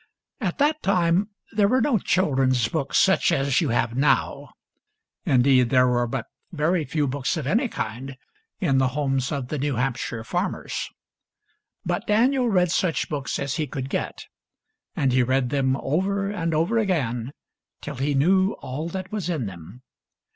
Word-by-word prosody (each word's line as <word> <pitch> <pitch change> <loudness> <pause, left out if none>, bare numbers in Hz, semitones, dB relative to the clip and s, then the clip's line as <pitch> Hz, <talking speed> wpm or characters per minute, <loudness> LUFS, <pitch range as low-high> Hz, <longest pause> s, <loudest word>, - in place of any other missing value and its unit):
At 190 -8 -2
that 300 +2 +2
time 185 +1 +2 0.2
there 205 -2 +3
were 255 +5 +3
no 245 -3 +2
children's 130 - +2
books 140 0 -1
such 190 -2 +4
as 135 -3 +2
you 155 - 0
have 115 0 0
now. 135 +2 +1 0.8
Indeed, 125 -1 +4
there 125 -1 +4
were 120 -1 +1
but 120 0 -3 0.3
very 165 0 0
few 150 +2 0
books 140 +4 -2
of 155 - -4
any 230 - +1
kind 130 - -5 0.4
in 135 -9 +2
the 130 - +3
homes 135 -2 0
of 135 -4 -3
the 150 - -3
New 145 -1 -1
Hamp 125 +1 0
shire 115 -2 -5
farmers. - - -3 1.0
But 175 +6 -2
Daniel 245 +4 +3
read 180 -4 +2
such 175 -2 0
books 140 -3 -3
as 140 +2 -3
he 155 -2 -1
could 135 +1 -5
get; - - -3 0.7
and 135 -3 +1
he 130 - +4
read 130 0 +1
them 135 -2 +1
over 195 +8 -1
and 165 -5 -2
over 175 +9 +2
again 130 - -1 0.5
till - - -7
he 140 +2 0
knew 185 +8 +3
all 150 +6 -5
that 185 +1 -6
was 205 -5 -3
in 155 -9 -1
them. 95 +6 -10
145 Hz, 170 wpm, -24 LUFS, 130-185 Hz, 1.0 s, such